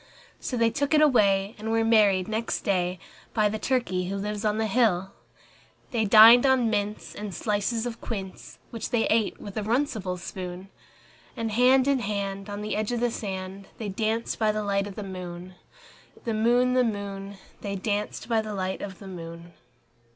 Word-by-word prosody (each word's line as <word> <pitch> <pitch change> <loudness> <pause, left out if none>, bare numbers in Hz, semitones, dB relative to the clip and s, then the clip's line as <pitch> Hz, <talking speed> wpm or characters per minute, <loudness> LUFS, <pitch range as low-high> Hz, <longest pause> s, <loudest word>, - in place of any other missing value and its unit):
So 250 - -3
they 230 -1 +3
took 285 +4 0
it 305 - +5
away, 200 -7 +3
and 220 +1 -4
were 225 0 +2
married 205 -5 +4
next 220 +1 -2
day 185 -3 0 0.4
By 215 -2 +3
the 215 +1 -3
turkey 215 -7 0
who 195 - -2
lives 210 +1 -3
on 210 0 +1
the 220 - +1
hill. 200 -4 +2 0.8
They 225 -3 +1
dined 225 +3 +9
on 260 -4 +3
mince 210 0 -2
and 205 -3 -6
slices 220 +2 -1
of 235 -1 -5
quince, 195 -5 -7
Which 230 - -5
they 235 -2 +1
ate 220 -1 +1
with 205 +1 -8
a - - 0
runcible 215 -5 -1
spoon; 180 +1 -7 0.7
And 225 -1 -2
hand 255 +4 +4
in 280 -2 +3
hand, 200 -2 -3
on 205 0 -5
the 215 - -2
edge 215 +2 -1
of 240 - -1
the 240 0 +1
sand, 195 -2 -6
They 215 -3 -4
danced 220 +3 -2
by 215 -1 +3
the 215 0 -2
light 200 0 0
of 200 - -9
the 210 - -5
moon, 180 -1 -7 0.7
The 230 - -2
moon, 240 +3 +3
The 255 0 +4
moon, 200 -3 -4 0.2
They 200 -1 -3
danced 205 +1 -3
by 225 -2 +2
the 215 -1 -6
light 190 0 -3
of 190 -3 -6
the 195 - -11
moon. 170 -1 -9
210 Hz, 190 wpm, -26 LUFS, 195-230 Hz, 0.8 s, dined